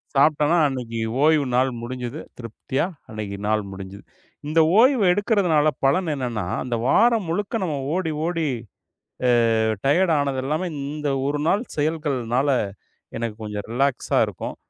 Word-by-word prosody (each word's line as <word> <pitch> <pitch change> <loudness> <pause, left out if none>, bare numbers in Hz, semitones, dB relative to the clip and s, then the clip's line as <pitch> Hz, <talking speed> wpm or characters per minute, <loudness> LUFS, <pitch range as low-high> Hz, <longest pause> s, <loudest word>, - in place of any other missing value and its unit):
சாப்ட்டேன்னா, 150 +3 +4
அன்னைக்கு 120 -4 -4 0.2
ஓய்வு 155 -2 +4
நாள் 130 +1 +3
முடிஞ்சது. 125 +3 -5 0.2
திருப்தியா 120 +6 -3 0.3
அன்னைக்கு 105 -2 -5
நாள் 110 0 +1
முடிஞ்சது. 95 +1 -9 0.4
இந்த 155 +2 +2 0.2
ஓய்வு 250 -1 +5
எடுக்கறதுனால 185 -7 +2 0.2
பலன் 160 +4 +2
என்னான்னா, 120 -7 -3 0.2
அந்த 125 -2 -2
வாரம் 230 - +3
முழுக்க 205 +4 -2
நம்ம 155 -5 -2 0.2
ஓடி, 170 -4 -1
ஓடி 165 -2 -1 1.1
அ 110 - +2 0.3
டயர்ட் 170 +4 +3
ஆனது 140 -2 -1
எல்லாமே, 155 +5 -1
இந்த 145 +1 -3 0.2
1 145 +1 -1
நாள் 205 +4 +2
செயல்கள்னால 145 -4 0 0.7
எனக்குக் 115 -1 -4
கொஞ்சம் 105 0 -5
ரிலாக்ஸா 135 +1 +1
இருக்கும். - - -6
145 Hz, 130 wpm, -23 LUFS, 120-165 Hz, 1.1 s, ஓய்வு